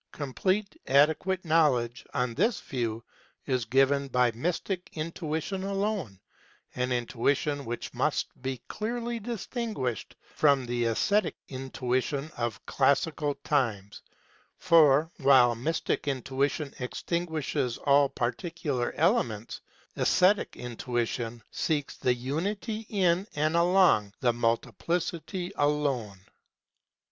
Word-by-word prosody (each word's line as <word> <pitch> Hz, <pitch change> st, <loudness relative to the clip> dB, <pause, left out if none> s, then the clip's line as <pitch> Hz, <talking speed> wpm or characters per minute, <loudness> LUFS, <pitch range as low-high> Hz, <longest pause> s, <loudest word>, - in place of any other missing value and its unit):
Complete, 185 Hz, +9 st, -1 dB
adequate 160 Hz, +7 st, +3 dB
knowledge, 135 Hz, -7 st, +2 dB
on 125 Hz, -1 st, -1 dB
this 220 Hz, -, +1 dB
view, 115 Hz, -3 st, -3 dB, 0.4 s
is 130 Hz, -4 st, 0 dB
given 135 Hz, +4 st, +3 dB
by 125 Hz, -2 st, +2 dB
mystic 175 Hz, -, -3 dB
intuition 160 Hz, +3 st, -3 dB
alone 195 Hz, -, -2 dB, 0.5 s
an 125 Hz, 0 st, -1 dB
intuition 135 Hz, +4 st, 0 dB
which 120 Hz, +1 st, -5 dB
must -, -, +1 dB, 0.2 s
be 130 Hz, -1 st, -3 dB
clearly 235 Hz, +2 st, -3 dB
distinguished 220 Hz, -, -4 dB, 0.2 s
from 140 Hz, -4 st, +3 dB
the 120 Hz, 0 st, -1 dB
aesthetic 200 Hz, -, +1 dB
intuition 130 Hz, +2 st, -2 dB
of 120 Hz, -2 st, -3 dB
classical 145 Hz, +2 st, +1 dB
times; 110 Hz, -9 st, -1 dB, 0.6 s
for 155 Hz, -1 st, +5 dB
while 130 Hz, -4 st, +6 dB
mystic 145 Hz, +6 st, -2 dB
intuition 140 Hz, +2 st, -1 dB
extinguishes 150 Hz, -2 st, -2 dB
all 140 Hz, -1 st, +4 dB
par 125 Hz, -3 st, 0 dB
ticular 145 Hz, -4 st, -3 dB
elements, 110 Hz, -1 st, 0 dB, 0.4 s
aesthetic 190 Hz, +3 st, +3 dB
intuition 120 Hz, -1 st, -3 dB
seeks 150 Hz, -4 st, -1 dB
the 125 Hz, -1 st, +1 dB
unity 200 Hz, -, -3 dB
in 185 Hz, -1 st, +2 dB
and 155 Hz, +2 st, +1 dB
along 170 Hz, -, +4 dB
the 120 Hz, -2 st, +2 dB
multiplicity 165 Hz, -, -2 dB
alone. 140 Hz, -8 st, 0 dB
140 Hz, 100 wpm, -28 LUFS, 125-170 Hz, 0.6 s, while